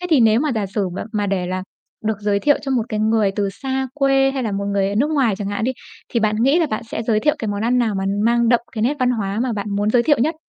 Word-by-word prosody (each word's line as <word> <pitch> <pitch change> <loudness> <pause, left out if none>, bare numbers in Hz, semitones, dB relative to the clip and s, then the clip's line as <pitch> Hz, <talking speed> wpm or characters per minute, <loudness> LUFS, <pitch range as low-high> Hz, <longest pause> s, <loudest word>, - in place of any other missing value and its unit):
Thế 360 - -3
thì 295 -6 +5
nếu 225 +1 +4
mà 300 +1 0
giả 215 -3 -1
sử 195 0 -2
mà - - -4
mà 205 -2 0
để 190 -2 -1
là 185 +1 -3 0.4
được 220 0 0
giới 205 -1 +1
thiệu 290 +4 +3
cho 275 - -4
một 250 -3 +2
cái 215 -1 -2
người 215 -2 +2
từ 205 -2 0
xa 265 0 -1
quê, 270 -1 +3
hay 270 -1 -3
là 220 - -2
một 200 0 -2
người 195 -1 +1
ở 200 - -3
nước 275 +9 +1
ngoài 265 -9 +2
chẳng 200 -1 -4
hạn 205 +2 -2
đi, 260 - 0 0.4
thì 235 - 0
bạn 215 0 +1
nghĩ 275 +6 +4
là 335 - +2
bạn 215 - -2
sẽ - - -3
giới 220 -2 +1
thiệu 300 - +2
cái 220 - -3
món 205 0 -2
ăn 245 +2 +2
nào 225 -4 +1
mà 190 - -2 0.2
mang 235 0 +3
đậm 240 0 +4
cái 215 - -3
nét 255 +6 +2
văn 255 -1 +2
hóa 205 -4 -2
mà 255 - -1
bạn 205 -1 -4
muốn 205 +1 +1
giới 240 +1 +4
thiệu 290 +3 +3
nhất? 310 +7 +1
225 Hz, 315 wpm, -20 LUFS, 205-265 Hz, 0.4 s, thì